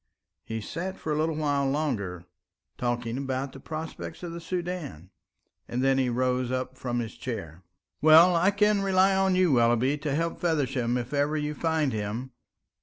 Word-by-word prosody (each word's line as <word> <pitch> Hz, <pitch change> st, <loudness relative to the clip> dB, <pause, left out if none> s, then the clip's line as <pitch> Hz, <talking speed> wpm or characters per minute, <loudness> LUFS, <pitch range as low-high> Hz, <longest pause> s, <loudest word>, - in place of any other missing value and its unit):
He 110 Hz, 0 st, -4 dB
sat 185 Hz, -, -5 dB
for 155 Hz, -, -4 dB
a 155 Hz, +2 st, +1 dB
while 145 Hz, -3 st, 0 dB
longer 105 Hz, -, -2 dB, 0.5 s
talking 120 Hz, 0 st, -2 dB
about 135 Hz, 0 st, -3 dB
the 135 Hz, -, -10 dB
prospects 160 Hz, +3 st, -7 dB
of 175 Hz, -, -4 dB
the 170 Hz, 0 st, -7 dB
Soudan, 170 Hz, -, -5 dB, 0.6 s
and 125 Hz, +2 st, -2 dB
then 135 Hz, -2 st, +2 dB
rose 125 Hz, 0 st, 0 dB
up 130 Hz, 0 st, -3 dB
from 125 Hz, -2 st, -3 dB
his 115 Hz, -2 st, -3 dB
chair. 85 Hz, -9 st, -6 dB, 0.4 s
"Well, 160 Hz, +3 st, +7 dB
I 175 Hz, +3 st, +4 dB
can 205 Hz, 0 st, +2 dB
rely 190 Hz, 0 st, +3 dB
on 190 Hz, -1 st, +2 dB
you, 185 Hz, -3 st, +3 dB
Willoughby, 120 Hz, +3 st, +3 dB
to 140 Hz, -1 st, -2 dB
help 165 Hz, +2 st, -1 dB
Feversham 135 Hz, -7 st, 0 dB
if 125 Hz, +3 st, -5 dB
ever 145 Hz, +2 st, +1 dB
you 150 Hz, 0 st, -2 dB
find 160 Hz, -3 st, 0 dB
him. 110 Hz, +5 st, -4 dB
140 Hz, 165 wpm, -27 LUFS, 125-165 Hz, 0.6 s, Well